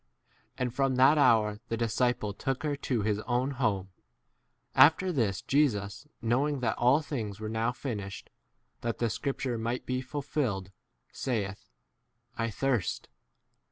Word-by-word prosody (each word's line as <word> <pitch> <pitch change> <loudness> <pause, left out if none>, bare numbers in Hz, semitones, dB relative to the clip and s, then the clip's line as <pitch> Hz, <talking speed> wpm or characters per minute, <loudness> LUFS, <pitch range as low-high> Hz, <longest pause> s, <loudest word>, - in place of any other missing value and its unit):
And 125 -2 -1
from 135 -1 +1
that 135 +4 +6
hour 105 -5 +4
the 115 - -1
disciple 115 -2 0
28 - - -30
took 135 +1 -1
her 150 -2 0
to 125 -4 -1
his 105 -1 0
own 125 +2 +1
[home]. 105 -8 -1 0.8
After 180 +5 +6
this, 110 - 0
Jesus, 120 -4 +1 0.2
knowing 135 +5 +1
that 125 - +1
all 130 +5 +5
things 110 -9 -4
were 110 - -4
now 110 +2 0
finished, 110 -6 -6 0.5
that 115 -2 -2
the 115 -2 0
scripture 130 +1 -2
might 120 +2 -2
be 130 0 -1
fulfilled, 130 -8 -2 0.4
saith, 100 -6 -3 0.7
29 115 - -1
1 - - -4
thirst. 125 -4 -1
120 Hz, 145 wpm, -29 LUFS, 105-135 Hz, 0.8 s, that